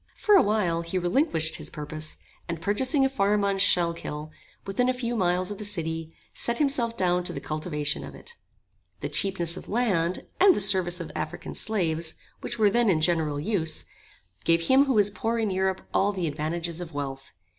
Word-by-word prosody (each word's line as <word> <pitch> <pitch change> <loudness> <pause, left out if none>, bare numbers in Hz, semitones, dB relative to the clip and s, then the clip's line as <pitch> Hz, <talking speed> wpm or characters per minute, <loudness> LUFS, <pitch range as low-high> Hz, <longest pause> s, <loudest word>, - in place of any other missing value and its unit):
For 420 - +2
a 380 - +8
while 195 -6 +1
he 170 +2 -3
relinquished 175 - +1
his - - -8
purpose, 155 0 -5 0.3
and 170 -1 -3
purchasing 260 - +2
a - - +5
farm 205 -5 +1
on 195 -1 0
Schuylkill, 170 -5 +1 0.3
within 225 +6 +1
a 255 - +1
few 240 -1 -2
miles 180 -2 +1
of 205 - -6
the - - -5
city, 165 -5 -3 0.2
set 235 0 0
himself 255 -6 +1
down 180 -1 +1
to - - 0
the - - -4
cultivation 155 -1 -1
of - - -9
it. 475 - -10 0.7
The - - -3
cheapness 175 -3 -1
of - - -10
land, 190 -7 0
and 380 -1 +7
the - - 0
service 185 -3 +3
of 170 - -7
African - - -5
slaves, 165 -7 -1 0.2
which - - -5
were 210 -2 +4
then 235 0 +3
in 165 -5 +3
general 155 -3 +1
use, 165 -2 0 0.6
gave 165 0 +3
him 265 +9 +5
who 270 - +1
was 205 -2 +4
poor 225 +3 -2
in 220 -3 0
Europe 190 0 0
all 200 +1 +3
the 185 -4 -3
advantages 165 +3 -3
of 170 -3 -8
wealth. 135 -1 -5
185 Hz, 190 wpm, -26 LUFS, 165-215 Hz, 0.7 s, a